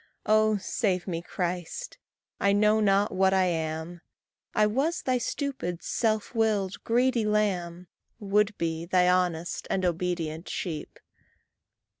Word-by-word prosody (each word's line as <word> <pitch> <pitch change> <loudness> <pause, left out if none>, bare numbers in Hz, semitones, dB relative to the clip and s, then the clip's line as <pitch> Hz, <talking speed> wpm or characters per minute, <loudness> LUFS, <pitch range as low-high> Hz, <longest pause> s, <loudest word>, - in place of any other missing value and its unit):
Oh, 215 0 +4
save 190 -2 -1
me, 170 -2 -2
Christ! 180 - -4 0.4
I 200 0 +3
know 210 +1 +4
not 200 0 +3
what 190 0 +3
I 190 -1 +4
am, 160 0 -3 0.5
I 215 - +4
was 275 +11 0
thy 255 -1 +1
stupid, 250 - -3
self 220 -1 0
willed, 210 -4 0
greedy 245 0 +2
lamb, 185 -5 -1 0.3
Would 210 0 +1
be 165 0 -2
thy 180 0 +3
honest 180 -2 0
and 190 -1 0
obedient 170 -2 -2
sheep. 160 -5 -5
190 Hz, 125 wpm, -27 LUFS, 175-215 Hz, 0.5 s, Oh